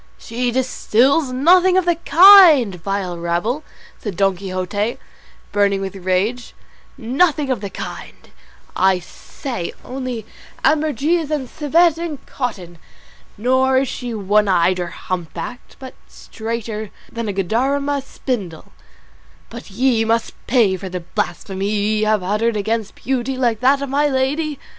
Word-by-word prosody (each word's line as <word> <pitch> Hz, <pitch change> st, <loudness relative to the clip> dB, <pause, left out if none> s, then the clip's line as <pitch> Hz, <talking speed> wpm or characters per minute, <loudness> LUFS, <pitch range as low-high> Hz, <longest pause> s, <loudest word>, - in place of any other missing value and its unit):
"She 245 Hz, +2 st, -3 dB
distils 260 Hz, +3 st, +1 dB
nothing 360 Hz, +8 st, +4 dB
of 375 Hz, -, +2 dB
the 345 Hz, -, +3 dB
kind, 335 Hz, -, +7 dB
vile 180 Hz, 0 st, -4 dB
rabble," 175 Hz, -, -1 dB, 0.4 s
said 200 Hz, -6 st, -6 dB
Don 195 Hz, -1 st, +2 dB
Quixote, 195 Hz, +4 st, -3 dB, 0.5 s
burning 200 Hz, -1 st, +2 dB
with 195 Hz, -1 st, -4 dB
rage, 195 Hz, +6 st, -2 dB, 0.4 s
"nothing 280 Hz, +3 st, +1 dB
of 250 Hz, -, -2 dB
the 200 Hz, -, -5 dB
kind, -, -, -9 dB, 0.4 s
I 190 Hz, 0 st, +3 dB
say, 180 Hz, -, -7 dB
only 250 Hz, -4 st, -5 dB, 0.4 s
ambergris 310 Hz, +1 st, +1 dB
and 295 Hz, -4 st, -2 dB
civet 320 Hz, +4 st, +2 dB
in 335 Hz, -4 st, -4 dB
cotton; 185 Hz, -10 st, -5 dB, 0.6 s
nor 260 Hz, +4 st, +2 dB
is 265 Hz, +1 st, +2 dB
she 245 Hz, -1 st, -5 dB
one 210 Hz, +1 st, +2 dB
eyed 185 Hz, 0 st, +2 dB
or 175 Hz, -, -2 dB
humpbacked, 175 Hz, +5 st, -6 dB
but 260 Hz, -1 st, -10 dB
straighter 220 Hz, -1 st, -6 dB, 0.2 s
than 230 Hz, -1 st, -4 dB
a -, -, 0 dB
Guadarrama 270 Hz, +9 st, 0 dB
spindle: 215 Hz, -, -5 dB, 0.8 s
but 235 Hz, -1 st, -9 dB
ye 230 Hz, +2 st, +1 dB
must 230 Hz, +1 st, 0 dB
pay 230 Hz, -7 st, +3 dB
for 190 Hz, +1 st, -7 dB
the 180 Hz, -1 st, -5 dB
blasphemy 190 Hz, +3 st, -3 dB
ye 210 Hz, +1 st, 0 dB
have 215 Hz, -3 st, +1 dB
uttered 215 Hz, +4 st, 0 dB
against 220 Hz, +1 st, -2 dB
beauty 260 Hz, 0 st, -2 dB
like 240 Hz, -4 st, +1 dB
that 275 Hz, +2 st, +3 dB
of 280 Hz, -, -4 dB
my 290 Hz, +2 st, +2 dB
lady." 285 Hz, +3 st, -1 dB
230 Hz, 135 wpm, -19 LUFS, 195-275 Hz, 0.8 s, kind